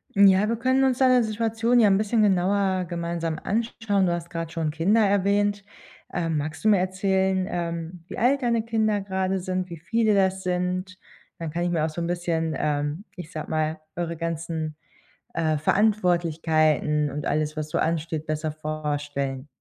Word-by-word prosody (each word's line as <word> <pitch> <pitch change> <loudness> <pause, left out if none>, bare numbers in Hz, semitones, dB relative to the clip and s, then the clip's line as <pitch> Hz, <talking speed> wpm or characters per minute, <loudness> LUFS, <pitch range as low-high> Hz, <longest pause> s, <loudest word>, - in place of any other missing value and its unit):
Hm, 200 0 +7
ja, 195 +2 +4
wir 230 - +1
können 260 +3 +2
uns 255 -2 +2
deine 255 -2 +5
Situation 225 +2 +1
ja 220 - +6
‘n 195 -1 +4
bisschen 215 +1 +2
genauer 190 -1 +2
gemeinsam 170 -2 -3
anschauen. 220 -2 0
Du - - +1
hast 170 0 -5
grad 165 -1 -4
schon 160 -2 -1
Kinder 190 +8 +2
erwähnt, 200 +1 +1 0.5
ähm, 165 -3 -1
magst 155 +1 -4
du 220 - +4
mir 205 -3 +5
erzählen, 190 0 +1
ähm, 170 -1 -4
wie - - -7
alt 270 +4 +2
deine 235 -2 +1
Kinder 215 -3 +1
grade 190 0 -1
sind, 185 0 -3
wie 170 - -7
viele 220 +5 +1
das 190 -1 +2
sind? 180 +1 -2 0.4
Dann 165 -2 -5
kann 170 - -3
ich 175 - 0
mir 165 -3 +1
auch - - -1
so 170 +2 -5
‘n 170 - -1
bisschen, 170 -2 -1
ähm, 150 +4 -1
ich 170 -3 -8
sage 155 - -6
mal, 155 0 0 0.2
eure 170 -1 -3
ganzen, 165 -1 -3 0.6
äh, 155 -2 +1
Verantwortlichkeiten 160 -6 +2
und 145 +2 -5
alles, 155 +1 0
was 155 0 -3
so - - 0
ansteht, 160 -1 -1
besser 155 0 -2
vorstellen. 145 -3 -3
175 Hz, 175 wpm, -25 LUFS, 160-200 Hz, 0.6 s, Hm